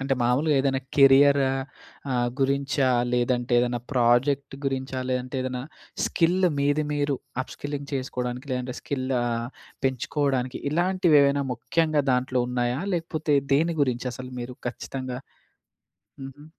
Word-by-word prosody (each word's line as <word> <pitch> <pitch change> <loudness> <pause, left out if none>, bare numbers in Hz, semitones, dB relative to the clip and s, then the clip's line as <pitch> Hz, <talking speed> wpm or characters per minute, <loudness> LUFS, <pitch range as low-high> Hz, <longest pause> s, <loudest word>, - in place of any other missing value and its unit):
అంటే, 135 0 0
మామూలుగా 140 +5 +2
ఏదైనా 135 -1 0 0.2
కెరియరా 140 0 +6 0.6
ఆహ్, 120 -1 +1
గురించా? 140 0 +1 0.2
లేదంటే, 125 0 0
ఏదన్నా 120 0 -1
ప్రాజెక్ట్ 135 +3 +2
గురించా? 130 -1 -2
లేదంటే, 125 +1 -2
ఏదైనా 125 -1 -3 0.4
స్కిల్ 180 +2 +2
మీద, 145 +1 +2 0.2
మీరు 145 -1 0 0.3
అప్‌స్కిల్లింగ్ 145 +1 -6
చేసుకోవడానికి 125 0 -4
లేదంటే 125 0 -3
స్కిల్ 130 -2 -3 0.2
ఆహ్, 120 0 -2 0.4
పెంచుకోవడానికి 130 0 -1
ఇలాంటివి 175 -1 +3
ఏవైనా 140 0 +2
ముఖ్యంగా 155 +4 +1
దాంట్లో 125 0 +1
ఉన్నాయా? 125 +1 -1
లేకపోతే, 160 -3 -1 0.2
దేని 165 +4 +2
గురించి 125 -2 -1
అసలు 125 +1 -8
మీరు? 125 +1 -6
ఖచ్చితంగా 130 +1 -5 1.0
హుహు. 135 +2 -10
135 Hz, 120 wpm, -25 LUFS, 125-145 Hz, 1.0 s, కెరియరా